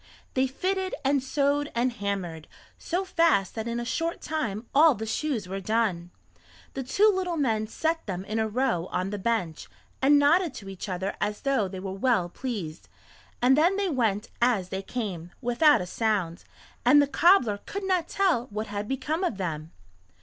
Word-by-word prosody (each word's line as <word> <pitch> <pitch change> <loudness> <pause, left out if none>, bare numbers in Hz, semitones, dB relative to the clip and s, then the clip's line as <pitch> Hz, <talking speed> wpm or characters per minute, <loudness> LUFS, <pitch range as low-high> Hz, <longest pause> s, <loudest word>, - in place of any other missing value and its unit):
They 260 0 +2
fitted 375 +7 -2
and 275 0 +3
sewed 285 +2 0
and 245 +2 +2
hammered, 190 -7 -4 0.3
so 360 +3 -2
fast 330 - +2
that 220 0 -4
in 235 0 -2
a 240 - -4
short 330 +7 -2
time 245 -9 -3
all 305 0 +6
the 220 - -5
shoes 225 -3 -2
were 195 +1 -4
done. 195 -4 0 0.6
The 270 - -3
two 390 +12 +3
little 360 -3 -1
men 220 -7 0
set 325 +7 -2
them 185 -1 -4
in 215 +2 -2
a 220 - +1
row 220 -6 0
on 185 +2 -2
the 205 - -4
bench, 185 -7 -2 0.3
and 285 +2 +6
nodded 300 +1 +3
to 195 -4 -8
each 195 +1 -7
other 190 +2 -3
as 210 0 -2
though 275 -8 +1
they 190 0 -7
were 190 0 -5
well 195 -3 +1
pleased, 185 -8 -6 0.5
and 260 +2 +6
then 335 +6 +3
they 400 -2 0
went 225 - 0
as 225 -7 +2
they 190 0 -3
came, 190 -6 -5
without 265 - +4
a - - -3
sound, 190 -4 -1 0.4
and 260 +5 +6
the 285 - +5
cobbler 280 - +4
could 400 0 -4
not 365 -3 +1
tell 350 -12 +1
what 215 -1 -4
had 205 0 -5
become 290 - -2
of 345 - -1
them. 160 -4 -4
235 Hz, 185 wpm, -27 LUFS, 195-290 Hz, 0.6 s, all